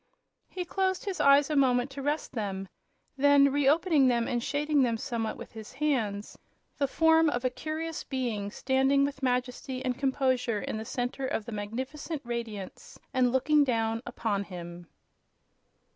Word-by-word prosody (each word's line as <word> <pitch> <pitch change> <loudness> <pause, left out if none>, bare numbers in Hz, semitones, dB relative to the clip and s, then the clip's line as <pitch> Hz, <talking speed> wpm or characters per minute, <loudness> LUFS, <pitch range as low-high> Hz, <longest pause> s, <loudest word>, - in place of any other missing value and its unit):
He 360 -1 -4
closed 375 +2 -1
his 380 -4 -3
eyes 280 +1 +5
a - - +1
moment 255 -1 +3
to 275 +1 -6
rest 290 +2 -2
them; 195 -4 -3 0.5
then 280 0 +5
re 280 -1 +3
opening 310 -3 +4
them 235 -2 +2
and 240 -1 -1
shading 295 +3 +1
them 235 -3 +2
somewhat 230 -3 -3
with - - -10
his 220 -1 -10
hands, 240 -8 -1
he - - -25
made - - -41
out - - -40
the 280 - +2
form 320 +2 +4
of 245 -2 -2
a 255 - +2
curious 310 +5 -4
Being 235 -7 -3
standing 270 +4 +2
with 280 -1 -5
majesty 255 +1 -2
and 250 -1 0
composure 260 -4 0
in 220 - -4
the 220 - -5
center 250 +3 -3
of 220 - -2
the 235 - -7
magnificent 260 +9 -5
radiance 230 -5 -6 0.2
and 255 -2 +3
looking 295 +3 +4
down 225 -3 0
upon 215 -4 -2
him! 175 -2 -9
260 Hz, 175 wpm, -29 LUFS, 230-285 Hz, 0.5 s, eyes